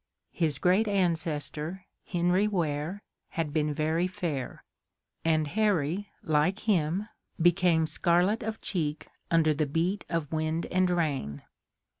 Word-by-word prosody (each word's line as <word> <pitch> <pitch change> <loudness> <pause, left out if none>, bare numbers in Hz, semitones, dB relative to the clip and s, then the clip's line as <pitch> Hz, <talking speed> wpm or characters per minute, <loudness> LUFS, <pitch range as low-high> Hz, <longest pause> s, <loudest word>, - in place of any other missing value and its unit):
His 155 -5 0
great 185 +7 +3
ancestor, 170 -2 -1 0.2
Henry 180 +3 +2
Ware, 170 0 -2 0.3
had 160 -3 -2
been 150 -1 +1
very 160 +4 +1
fair, 170 -9 -4 0.6
and 155 -1 +2
Harry, 200 -1 +1
like 155 +6 +1
him, 190 -1 +1 0.3
became 175 -1 +4
scarlet 175 +7 +2
of 220 0 -4
cheek 155 -5 -3 0.2
under 160 -2 +4
the 150 0 0
beat 170 +7 0
of 165 -4 -2
wind 160 +1 -1
and 185 0 +3
rain. 145 - -1
170 Hz, 120 wpm, -29 LUFS, 155-185 Hz, 0.6 s, became